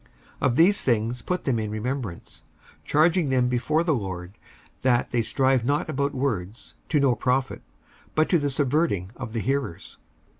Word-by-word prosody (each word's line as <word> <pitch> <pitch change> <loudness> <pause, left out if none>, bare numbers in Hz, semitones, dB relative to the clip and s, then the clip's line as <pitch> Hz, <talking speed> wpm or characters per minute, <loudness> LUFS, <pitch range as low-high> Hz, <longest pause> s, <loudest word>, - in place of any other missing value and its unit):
55:002:014 - - +3
Of 120 - 0
these 185 +7 +5
things 115 0 0
put 180 0 -2
them 125 -5 0
in 110 -1 -3
remembrance, 110 -3 -5 0.4
charging 160 +1 +3
them 125 -2 +2
before 140 +6 +1
the 165 -2 +2
Lord 95 -6 -4 0.5
that 125 -2 +2
they 120 - +2
strive 130 +2 +2
not 145 +5 0
about 140 0 -1
words 115 -5 -3 0.2
to 150 - +2
no 140 -3 +4
profit, 130 +3 -1 0.5
but 155 0 +3
to 175 - +4
the 145 -1 0
subverting 135 - 0
of 115 -3 -7
the 115 - -1
hearers. 135 -10 -3
130 Hz, 165 wpm, -25 LUFS, 115-145 Hz, 0.5 s, these